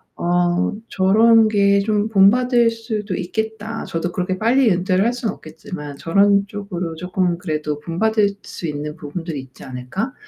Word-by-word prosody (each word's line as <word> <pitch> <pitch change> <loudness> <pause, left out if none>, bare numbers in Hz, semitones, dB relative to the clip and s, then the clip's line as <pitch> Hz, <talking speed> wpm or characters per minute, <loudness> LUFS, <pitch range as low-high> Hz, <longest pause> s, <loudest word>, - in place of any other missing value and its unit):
어 175 +1 +1 0.2
'저런 220 +4 +5
게 200 -1 +3
좀 210 0 0
본받을 235 +4 +4
수도 215 -4 -4
있겠다. 220 +4 -4
저도 170 +1 -3
그렇게 185 +1 -2
빨리 235 0 +3
은퇴를 185 +2 +1
할 235 - +3
순 240 -3 -3
없겠지만 155 -4 -8
저런 200 +4 +3
쪽으로 185 -5 -5
쪼끔 180 0 -1
그래도 150 -3 -3
본받을 205 +5 +1
수 170 - -8
있는 150 0 -5
부분들이 155 -1 -5
있지 130 0 -15
않을까? 130 - -4
190 Hz, 315 characters per minute, -20 LUFS, 170-220 Hz, 0.2 s, 저런